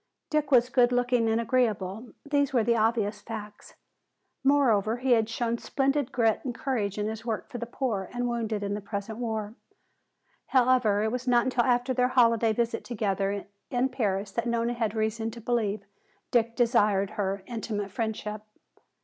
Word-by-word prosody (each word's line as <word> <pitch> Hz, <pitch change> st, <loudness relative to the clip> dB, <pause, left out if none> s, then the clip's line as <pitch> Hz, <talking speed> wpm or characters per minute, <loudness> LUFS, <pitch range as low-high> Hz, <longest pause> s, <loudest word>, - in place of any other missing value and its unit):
Dick 305 Hz, -2 st, +1 dB
was 250 Hz, -2 st, +4 dB
good 245 Hz, -1 st, +4 dB
looking 245 Hz, -2 st, +2 dB
and 225 Hz, +1 st, +2 dB
agreeable, 225 Hz, -2 st, 0 dB
these 285 Hz, -1 st, +1 dB
were 235 Hz, -4 st, +3 dB
obvious 220 Hz, -2 st, +1 dB
facts. 210 Hz, -1 st, -9 dB, 0.7 s
Moreover, 240 Hz, -6 st, +3 dB
he 255 Hz, +1 st, -1 dB
had 225 Hz, -2 st, +4 dB
shown 230 Hz, 0 st, -1 dB
splendid 275 Hz, -1 st, 0 dB
grit 225 Hz, -3 st, +2 dB
and 245 Hz, -3 st, -4 dB
courage 215 Hz, -7 st, -2 dB
in 210 Hz, 0 st, -1 dB
his 220 Hz, 0 st, -5 dB
work 220 Hz, -5 st, -4 dB
for 245 Hz, -, -5 dB
the 235 Hz, -, -4 dB
poor 225 Hz, -7 st, -2 dB
and 245 Hz, 0 st, -2 dB
wounded 225 Hz, -3 st, -2 dB
in 200 Hz, 0 st, -2 dB
the 205 Hz, -, -3 dB
present 200 Hz, +2 st, -5 dB
war. 220 Hz, -3 st, -3 dB, 0.9 s
However, 245 Hz, -5 st, +3 dB
it 220 Hz, -, 0 dB
was 250 Hz, +1 st, -4 dB
not 240 Hz, -1 st, +4 dB
until 255 Hz, -2 st, +1 dB
after 245 Hz, 0 st, +2 dB
their 250 Hz, 0 st, +2 dB
holiday 230 Hz, -3 st, +3 dB
visit 230 Hz, +1 st, -1 dB
together 200 Hz, -3 st, -2 dB, 0.2 s
in 250 Hz, +1 st, +1 dB
Paris 200 Hz, -5 st, -1 dB
that 235 Hz, +4 st, -2 dB
Nona 235 Hz, 0 st, 0 dB
had 225 Hz, -2 st, -2 dB
reason 220 Hz, +1 st, -1 dB
to 230 Hz, +1 st, -9 dB
believe 215 Hz, -3 st, -1 dB, 0.5 s
Dick 230 Hz, -1 st, +2 dB
desired 210 Hz, -5 st, +2 dB
her 200 Hz, -2 st, -2 dB
intimate 215 Hz, -4 st, -4 dB
friendship. 215 Hz, -1 st, -3 dB
230 Hz, 165 wpm, -27 LUFS, 210-245 Hz, 0.9 s, was